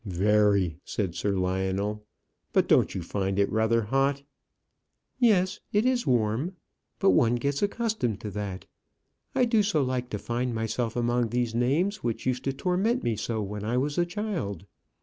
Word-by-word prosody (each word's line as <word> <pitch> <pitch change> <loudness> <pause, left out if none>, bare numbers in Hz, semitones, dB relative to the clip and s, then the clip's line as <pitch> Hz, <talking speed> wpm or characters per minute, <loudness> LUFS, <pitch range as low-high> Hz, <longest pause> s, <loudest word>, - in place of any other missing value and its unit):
"Very," 100 -3 +2
said 95 -5 -2
Sir 100 +3 -1
Lionel. 95 +3 -1 0.5
"But - - +3
don't - - +3
you 90 - -3
find 95 +2 -2
it 100 0 +2
rather 110 +1 +2
hot?" 135 +5 +1 1.0
"Yes, 205 -5 +3
it 210 +3 +2
is 255 -1 +1
warm. 125 - +1 0.4
But 195 - +4
one 120 0 +4
gets 140 +3 -1
accustomed 205 - -1
to 105 - -5
that. 100 -2 -5 0.7
I 250 - +4
do 230 -2 +3
so 195 -8 +1
like 125 -1 -2
to 105 - -3
find 120 +3 -2
myself 110 +1 -2
among 120 -1 +1
these 120 -1 -1
names 145 - +1
which 115 - -3
used 130 0 -1
to 135 - +1
torment 190 - 0
me 115 - 0
so 110 0 -2
when 105 +1 -5
I 115 +3 0
was 145 +5 0
a 175 - +3
child. 175 - -4
120 Hz, 170 wpm, -27 LUFS, 105-170 Hz, 1.0 s, But